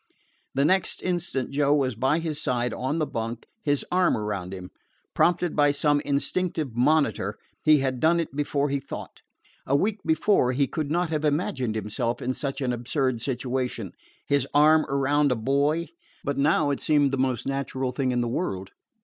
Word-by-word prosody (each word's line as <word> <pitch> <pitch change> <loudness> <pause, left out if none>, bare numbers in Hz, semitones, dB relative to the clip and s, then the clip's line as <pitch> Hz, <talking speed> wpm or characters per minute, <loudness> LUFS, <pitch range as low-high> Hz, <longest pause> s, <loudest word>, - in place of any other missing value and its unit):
The 140 - +3
next 190 +3 +1
instant 175 -8 -2
Joe 145 +1 +3
was 135 -3 +1
by 130 +7 +1
his 160 -3 -3
side 120 -1 0
on 130 +5 -2
the 155 - +1
bunk, 115 -2 -4 0.2
his 145 -7 0
arm 180 0 +3
around 100 -4 -3
him. 90 -1 -8 0.4
Prompted 175 0 +2
by 145 -1 +4
some 145 0 +2
instinctive 145 -1 -2
monitor, 150 +5 +2 0.3
he 155 -2 +5
had 130 -2 -1
done 165 +4 +3
it 165 -5 -4
before 145 0 0
he 140 0 0
thought. - - -9 0.5
A 135 - +2
week 205 +8 +1
before 160 -5 +2
he 140 +2 +2
could 150 +1 -3
not 170 +1 0
have 155 -1 -1
imagined 140 -6 0
himself 110 +2 -2
in 130 - -2
such 140 +1 -4
an 125 -2 0
absurd 120 0 -1
situation 125 -5 -2 0.3
his 140 -2 +1
arm 155 +1 +6
around 140 +1 +2
a - - +2
boy; 140 +7 +1 0.3
but 140 - -1
now 145 0 +2
it 140 - -2
seemed 145 -3 +3
the 135 - -1
most 130 -3 0
natural 135 -1 -2
thing 130 -1 -1
in 125 -1 +1
the 120 - -1
world. 95 - -3
140 Hz, 180 wpm, -26 LUFS, 125-155 Hz, 0.5 s, arm